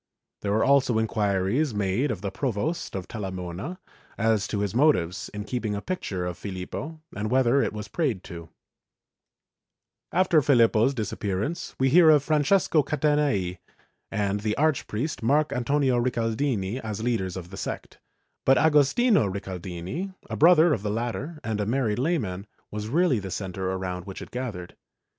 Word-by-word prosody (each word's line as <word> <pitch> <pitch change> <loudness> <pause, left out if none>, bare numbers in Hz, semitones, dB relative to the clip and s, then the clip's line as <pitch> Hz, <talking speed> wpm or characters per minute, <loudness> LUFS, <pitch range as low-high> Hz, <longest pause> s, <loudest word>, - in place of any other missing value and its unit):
There 100 - -1
were 110 +2 +2
also 135 -4 +3
inquiries 110 +4 0
made 105 +7 0
of 105 -7 -3
the 100 - -3
Provost 140 - -2
of 95 -1 -4
Talamona 95 - -5 0.4
as 110 -1 +2
to 105 - -2
his 100 -2 -1
motives 115 - +2
in 105 0 -5
keeping 110 -1 -2
a - - -2
picture 100 - -3
of 90 -1 -5
Filippo 105 - -6
and 105 +1 -2
whether 130 +2 +3
it - - 0
was 105 -1 -6
prayed 125 - -1
to/ 85 -3 -9 1.6
After 175 -2 +4
Filippo's 120 -1 +4
disappearance 105 - -3
we 130 0 +3
hear 165 +3 +7
of 150 -3 +6
Francesco 155 +2 +3
Catanei 145 - 0 0.5
and 105 -2 -1
of - - -11
the 110 -1 -1
Archpriest 145 -2 0
Marc 145 +6 +2
Antonio 130 +1 +1
Ricaldini 115 -2 -1
as 110 -2 -5
leaders 95 -7 -1
of 90 -1 -8
the - - -7
sect, - - -6 0.4
but 135 0 +5
Agostino 160 - +4
Ricaldini, 95 - -5
a - - -4
brother 165 0 +6
of 100 - -2
the 105 - -2
latter 120 +8 -3
and 110 -2 -2
a 100 - -2
married 120 -3 0
lay 165 +7 +2
man, 100 - -5 0.2
was 105 0 -4
really 160 -3 +3
the 95 -1 -6
centre 95 0 -3
around 90 -1 -4
which 95 - -7
it - - -13
gathered. 110 -9 -5
115 Hz, 160 wpm, -26 LUFS, 100-145 Hz, 1.6 s, hear